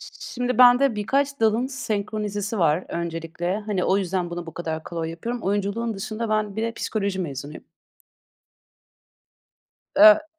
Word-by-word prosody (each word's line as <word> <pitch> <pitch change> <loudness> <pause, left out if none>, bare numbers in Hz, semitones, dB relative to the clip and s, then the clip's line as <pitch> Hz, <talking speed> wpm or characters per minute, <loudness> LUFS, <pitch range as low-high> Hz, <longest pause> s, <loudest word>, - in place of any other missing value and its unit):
ş - - -10 0.2
şimdi 245 0 -1
bende 250 +1 +7
birkaç 275 +6 0
dalın 225 +3 +3
senkronizesi 210 -4 -3
var, 165 0 +2
öncelikle. 170 +2 -3
Hani, 195 -4 0
o 190 - +3
yüzden 180 -2 -2
bunu 175 0 -5
bu 165 - -9
kadar 160 -2 -4
kolay 165 -1 -4
yapıyorum. 230 +8 -5
Oyunculuğun 205 +3 -1
dışında, 215 +3 -4
ben 215 -2 0
bir 220 - -1
de 230 0 -1
psikoloji 200 -4 -2
mezunuyum. 145 -3 -5 2.3
E 315 +1 +8
205 Hz, 140 wpm, -24 LUFS, 175-230 Hz, 2.3 s, E